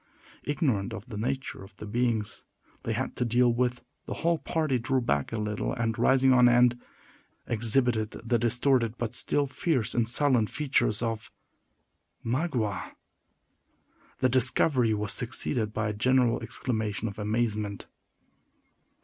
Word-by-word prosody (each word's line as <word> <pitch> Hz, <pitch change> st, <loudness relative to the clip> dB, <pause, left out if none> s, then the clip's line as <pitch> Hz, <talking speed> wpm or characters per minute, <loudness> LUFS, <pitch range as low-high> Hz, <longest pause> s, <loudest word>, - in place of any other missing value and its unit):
Ignorant 135 Hz, -, 0 dB
of 105 Hz, -, -8 dB
the 120 Hz, -, -8 dB
nature 130 Hz, 0 st, -3 dB
of 95 Hz, +1 st, -15 dB
the -, -, -8 dB
beings 115 Hz, -1 st, -1 dB, 0.4 s
they -, -, -2 dB
had -, -, -3 dB
to -, -, +1 dB
deal 120 Hz, +1 st, +3 dB
with, 125 Hz, 0 st, -1 dB, 0.2 s
the -, -, -4 dB
whole 170 Hz, 0 st, 0 dB
party 155 Hz, -6 st, 0 dB
drew 130 Hz, +3 st, 0 dB
back 70 Hz, -, -1 dB
a 115 Hz, -, -2 dB
little, 105 Hz, -1 st, -2 dB
and, 115 Hz, -2 st, -1 dB
rising 130 Hz, 0 st, +4 dB
on 125 Hz, -1 st, +6 dB
end, 120 Hz, 0 st, +4 dB, 0.7 s
exhibited 115 Hz, -1 st, +1 dB
the 115 Hz, +1 st, -2 dB
distorted 120 Hz, 0 st, +2 dB
but 120 Hz, -2 st, -3 dB
still 145 Hz, -, +1 dB
fierce 135 Hz, -, -1 dB
and 115 Hz, -1 st, +1 dB
sullen 125 Hz, -4 st, +3 dB
features 130 Hz, -6 st, 0 dB
of 115 Hz, -2 st, -3 dB, 1.0 s
Magua. 120 Hz, -, -2 dB, 1.2 s
The 130 Hz, -, +2 dB
discovery 125 Hz, -1 st, +3 dB
was 105 Hz, 0 st, -1 dB
succeeded 120 Hz, -2 st, -2 dB
by 105 Hz, 0 st, -2 dB
a -, -, -2 dB
general 125 Hz, +2 st, +2 dB
exclamation 110 Hz, -2 st, -3 dB
of 100 Hz, 0 st, -7 dB
amazement. 105 Hz, -1 st, -2 dB
120 Hz, 140 wpm, -28 LUFS, 110-130 Hz, 1.2 s, on